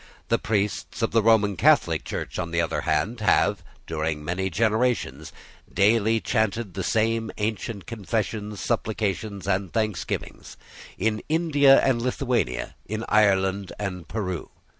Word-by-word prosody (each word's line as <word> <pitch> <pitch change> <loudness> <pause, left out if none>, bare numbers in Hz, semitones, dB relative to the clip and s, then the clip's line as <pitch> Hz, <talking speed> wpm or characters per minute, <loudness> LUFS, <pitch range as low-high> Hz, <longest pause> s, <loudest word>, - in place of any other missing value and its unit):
The - - +2
priests 105 -2 -2
of - - +1
the 115 - +4
Roman 105 -2 +4
Catholic 75 - +3
Church, - - -5
on 85 -2 -2
the 85 0 -1
other 85 - 0
hand, 115 +3 0
have, 105 -2 +2 0.2
during 80 -2 -3
many 95 +3 -1
generations, 110 - 0 0.4
daily 110 +3 +3
chanted 110 -3 -1
the - - -3
same 115 0 +1
ancient 105 -2 -3
confessions, 105 -1 -3
supplications, 105 -3 -2
and 95 -2 0
thanksgivings, 110 -6 -3 0.4
in 110 +2 0
India 145 -4 +5
and 125 -3 +2
Lithuania, 120 - -1
in 110 +1 -3
Ireland 100 -2 +2
and 90 -5 -5
Peru. 95 -6 -4
105 Hz, 130 wpm, -25 LUFS, 95-115 Hz, 0.4 s, India